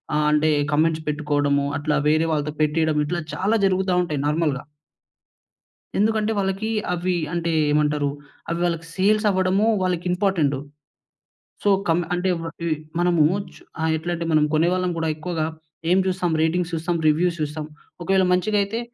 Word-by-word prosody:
ఆహ్, 150 Hz, 0 st, +2 dB
అంటే 150 Hz, +1 st, +3 dB, 0.2 s
కామెంట్స్ 155 Hz, +1 st, +1 dB
పెట్టుకోవడము. 145 Hz, -1 st, 0 dB
అట్లా 150 Hz, 0 st, 0 dB
వేరే 155 Hz, +2 st, +2 dB
వాళ్ళతో 150 Hz, 0 st, -1 dB
పెట్టియడం. 155 Hz, 0 st, +1 dB
ఇట్లా 175 Hz, +3 st, -2 dB
చాలా 205 Hz, +4 st, +1 dB
జరుగుతా 190 Hz, -1 st, +1 dB
ఉంటాయి 150 Hz, -5 st, -3 dB
నార్మల్‌గా. 150 Hz, -3 st, 0 dB, 1.3 s
ఎందుకంటే 215 Hz, +1 st, +2 dB
వాళ్ళకి 195 Hz, +2 st, -1 dB, 0.2 s
అవి 180 Hz, +1 st, -1 dB, 0.2 s
అంటే 170 Hz, -1 st, -1 dB, 0.2 s
ఏమంటారు 150 Hz, -1 st, +1 dB, 0.4 s
అవి 170 Hz, 0 st, -2 dB
వాళ్ళకి 165 Hz, -1 st, -2 dB
సేల్స్ 210 Hz, +3 st, +2 dB
అవ్వడము 190 Hz, +2 st, +2 dB
వాళ్ళకి 180 Hz, -2 st, -1 dB
ఇంపార్టెంటు. 175 Hz, -7 st, +1 dB, 1.0 s
సో, 205 Hz, -, +3 dB, 0.2 s
కం 165 Hz, +1 st, +3 dB
అంటే 180 Hz, +1 st, 0 dB
వ -, -, -6 dB, 0.2 s
ఇవి 165 Hz, -2 st, +1 dB, 0.2 s
మనము 175 Hz, -3 st, +3 dB, 0.3 s
చు -, -, -16 dB, 0.2 s
ఆహ్, 160 Hz, -, +1 dB
ఎట్లా 165 Hz, +3 st, -4 dB
అంటే 170 Hz, 0 st, -4 dB
మనం 155 Hz, -1 st, +4 dB
కొనేవాళ్ళం 180 Hz, +3 st, +2 dB
కూడా 160 Hz, -1 st, 0 dB
ఎక్కువగా 160 Hz, 0 st, -3 dB, 0.5 s
ఏం 185 Hz, -, +5 dB
చూస్తాం 180 Hz, -2 st, 0 dB
రేటింగ్ 165 Hz, +2 st, +1 dB
చూస్తాం, 165 Hz, +1 st, -1 dB
రివ్యూస్ 170 Hz, +3 st, +2 dB
చూస్తాం. 150 Hz, 0 st, -3 dB, 0.4 s
ఒకవేళ 190 Hz, +2 st, +2 dB
మంచిదైతే 205 Hz, +3 st, 0 dB
170 Hz, 145 wpm, -23 LUFS, 155-185 Hz, 1.3 s, ఏం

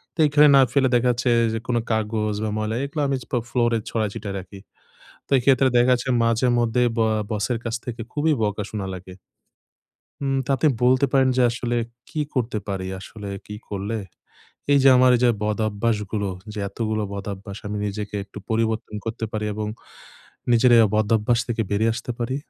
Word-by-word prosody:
তো -, -, -19 dB
এখানে 145 Hz, +1 st, +6 dB
না 135 Hz, -, +8 dB
ফেলে 135 Hz, -2 st, +3 dB
দেখা 120 Hz, +1 st, +3 dB
যাচ্ছে 120 Hz, +1 st, 0 dB, 0.2 s
যে 115 Hz, -, -1 dB
কোন 125 Hz, -, 0 dB, 0.2 s
কাগজ 110 Hz, -1 st, 0 dB
বা, 110 Hz, -, -1 dB
ময়লা 110 Hz, +1 st, -2 dB
এগুলো 150 Hz, +2 st, -3 dB
আমি 135 Hz, -, 0 dB
পা -, -, -11 dB
ফ্লো 125 Hz, -, 0 dB
ফ্লোরে 120 Hz, -2 st, +2 dB
ছড়াই 110 Hz, -2 st, 0 dB
ছিটায় 100 Hz, -1 st, -5 dB
রাখি। 95 Hz, +2 st, -11 dB, 0.7 s
তো -, -, -31 dB
এইক্ষেত্রে 130 Hz, +1 st, +4 dB
দেখা 120 Hz, +1 st, +4 dB
যাচ্ছে 125 Hz, +1 st, -2 dB
মাঝেমধ্যে 120 Hz, 0 st, +2 dB, 0.2 s
ব্য -, -, +2 dB, 0.3 s
বসের 110 Hz, +3 st, -1 dB
কাছ 115 Hz, -1 st, -3 dB
থেকে 120 Hz, -1 st, -5 dB
খুবই 155 Hz, +2 st, +1 dB
বকা 105 Hz, 0 st, -1 dB
শোনা 105 Hz, -3 st, -4 dB
লাগে। 95 Hz, 0 st, -10 dB, 1.1 s
উম 135 Hz, -1 st, 0 dB
তাতে 135 Hz, +2 st, +1 dB, 0.2 s
বলতে 130 Hz, +2 st, +4 dB
পারেন 135 Hz, -1 st, +4 dB
যে -, -, +4 dB
আসলে 120 Hz, 0 st, -2 dB, 0.3 s
কি 155 Hz, -, -4 dB
করতে 120 Hz, -4 st, -1 dB
পারি? 95 Hz, -2 st, -3 dB
আসলে 105 Hz, +2 st, -9 dB, 0.2 s
কি 105 Hz, -, -6 dB
করলে 100 Hz, +2 st, -3 dB, 0.8 s
এইযে 140 Hz, -1 st, +5 dB
আমার 130 Hz, 0 st, +6 dB
এইযে 125 Hz, 0 st, +3 dB
বদভ্যাসগুলো 105 Hz, -1 st, -1 dB, 0.2 s
যে 105 Hz, -, -5 dB
এতগুলো 110 Hz, +1 st, -2 dB
বদভ্যাস, 100 Hz, 0 st, -6 dB
আমি 105 Hz, 0 st, -3 dB
নিজেকে 105 Hz, 0 st, -5 dB
একটু -, -, -13 dB
পরিবর্তন 110 Hz, -1 st, -1 dB
করতে 115 Hz, 0 st, -3 dB
পারি 105 Hz, 0 st, -2 dB
এবং 105 Hz, 0 st, -3 dB, 0.8 s
নিজের 120 Hz, +1 st, +5 dB
এই -, -, +8 dB
বদভ্যাস 110 Hz, +2 st, +2 dB
থেকে 120 Hz, -1 st, -1 dB
বেরিয়ে 110 Hz, +3 st, +2 dB
আসতে 120 Hz, +1 st, -4 dB
পারি? 120 Hz, +2 st, -2 dB
115 Hz, 175 wpm, -23 LUFS, 105-125 Hz, 1.1 s, না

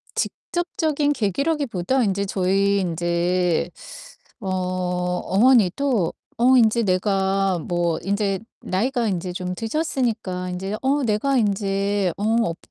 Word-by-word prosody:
직접적인 310 Hz, -4 st, -1 dB
계기라기 280 Hz, -, 0 dB
보다 235 Hz, +6 st, 0 dB
인제 200 Hz, -1 st, 0 dB
저희 195 Hz, +1 st, +1 dB
인제 175 Hz, 0 st, 0 dB, 0.7 s
어 195 Hz, -, -7 dB
어머니도 185 Hz, +5 st, +1 dB, 0.2 s
어 255 Hz, +3 st, +5 dB
인제 230 Hz, 0 st, +4 dB
내가 195 Hz, -1 st, +1 dB
뭐 170 Hz, 0 st, -1 dB
인제 200 Hz, 0 st, 0 dB, 0.2 s
나이가 235 Hz, +5 st, 0 dB
인제 180 Hz, -2 st, -2 dB
좀 180 Hz, 0 st, -4 dB
드셨으니까 225 Hz, -, -2 dB
인제 190 Hz, +3 st, -3 dB
어 275 Hz, +2 st, +1 dB
"내가 245 Hz, +5 st, +1 dB
인제 200 Hz, -3 st, 0 dB
어 205 Hz, -, -4 dB, 0.2 s
업 165 Hz, 0 st, -3 dB
195 Hz, 230 characters per minute, -22 LUFS, 180-235 Hz, 0.7 s, 어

